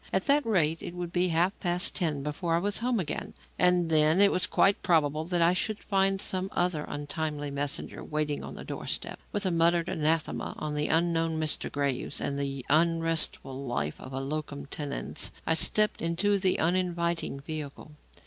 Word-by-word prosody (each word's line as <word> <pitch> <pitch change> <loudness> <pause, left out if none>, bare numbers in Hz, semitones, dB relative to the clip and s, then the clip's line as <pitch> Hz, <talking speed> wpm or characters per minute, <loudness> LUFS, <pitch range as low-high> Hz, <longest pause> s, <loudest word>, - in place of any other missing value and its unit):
At 190 - +1
that 285 +1 +4
rate 165 -7 +2
it 175 - -6
would 175 -1 -5
be 180 0 +3
half 175 +3 +1
past 180 +1 0
ten 155 -6 0
before 165 +3 -1
I - - +3
was 200 +3 0
home 240 -1 +1
again, 175 - -4 0.2
and 180 -1 +4
then 155 +2 +4
it 200 0 +6
was 180 - 0
quite 195 +1 +3
probable 155 -2 +2
that 175 0 +2
I 170 +2 +5
should 215 +3 0
find 195 -1 +1
some 190 -1 -1
other 175 -4 0
untimely 145 0 -3
messenger 145 +2 -3
waiting 150 -1 -2
on - - -7
the - - -8
doorstep. - - -4
With 205 -1 -2
a 185 - +2
muttered 170 0 +3
anathema 155 0 -1
on 150 -1 -3
the 150 0 0
unknown 165 -1 +1
Mr. 155 -1 -1
Graves 140 -1 -1
and 140 0 -2
the 135 -2 -3
unrestful 165 -3 +1
life 75 -11 -2
of 130 - -9
a 135 - -3
locum 145 0 -4
tenens, 140 0 -3
I 160 - +3
stepped 210 +6 +2
into 195 +5 +1
the 185 -1 +2
uninviting 170 -3 0
vehicle. 150 0 -7
165 Hz, 180 wpm, -29 LUFS, 150-180 Hz, 0.2 s, it